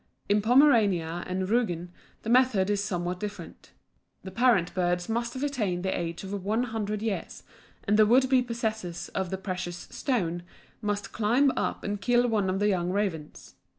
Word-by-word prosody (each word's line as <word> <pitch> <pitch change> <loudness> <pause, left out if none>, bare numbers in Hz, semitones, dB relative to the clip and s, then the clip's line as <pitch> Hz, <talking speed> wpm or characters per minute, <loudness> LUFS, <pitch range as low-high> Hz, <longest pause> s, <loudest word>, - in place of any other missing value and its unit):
In 205 +1 +3
Pomerania 210 - +3
and 185 0 -2
Rügen 180 -6 0 0.3
the 225 - -4
method 235 -6 +4
is 200 -1 0
somewhat 180 -3 -3
different. 210 0 -8 0.5
The 190 - -7
parent 210 -5 +2
birds 175 -1 0
must 235 +2 -2
have 260 - -4
attained 210 -11 -1
the 190 - 0
age 170 +1 -4
of 195 +1 -6
one 220 +5 +1
hundred 215 -3 -3
years, 220 -4 -4 0.4
and 210 +1 +2
the 215 - +7
would 260 +4 +5
be 260 -1 +4
possessor 220 -7 -4
of 190 -2 -2
the 190 - -3
precious 180 -2 -5
"stone" 175 - -1 0.4
must 205 -1 -2
climb 240 +6 +3
up - - -2
and 205 -1 -3
kill 245 +3 +3
one 210 -5 +1
of 185 - 0
the 205 +1 +1
young 180 -3 0
ravens. 185 -6 -3
205 Hz, 175 wpm, -27 LUFS, 180-230 Hz, 0.5 s, the